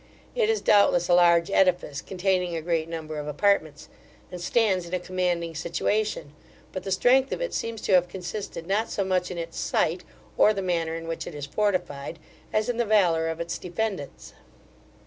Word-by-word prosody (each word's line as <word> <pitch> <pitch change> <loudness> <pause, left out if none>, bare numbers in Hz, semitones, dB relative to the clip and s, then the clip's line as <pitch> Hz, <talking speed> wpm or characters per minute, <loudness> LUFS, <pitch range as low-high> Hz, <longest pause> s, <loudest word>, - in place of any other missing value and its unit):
It 465 -3 +1
is, 445 -1 +1
doubtless, 180 -4 +4
a - - +5
large 170 0 +5
edifice, 175 -7 +2
containing 180 -2 -1
a 165 - -2
great 165 -1 -1
number 155 -2 -5
of 150 - -6
apartments, 155 -2 +1 0.4
and 180 -1 -7
stands 190 -2 +1
in 175 - -2
a - - -1
commanding 175 -2 -1
situation; 170 +1 -2 0.4
but 185 - -5
the 195 - -5
strength 255 +7 +3
of - - -2
it - - -3
seems 230 -2 -3
to 195 - 0
have 180 -1 +5
consisted 185 -1 -6
not 205 +5 0
so 200 - -1
much 185 -1 0
in 180 - -6
its 165 0 -5
site, 175 +3 0 0.4
or 215 - +6
the 195 - -2
manner 165 -3 -1
in 165 0 -6
which 165 - -4
it 155 - -7
is 145 -1 -5
fortified, 175 -4 -2 0.3
as 215 0 +1
in 245 -1 -1
the 240 - +2
valour 175 -7 +3
of 165 0 -3
its 170 0 -4
defendants. 180 -4 -4
180 Hz, 190 wpm, -26 LUFS, 165-200 Hz, 0.4 s, or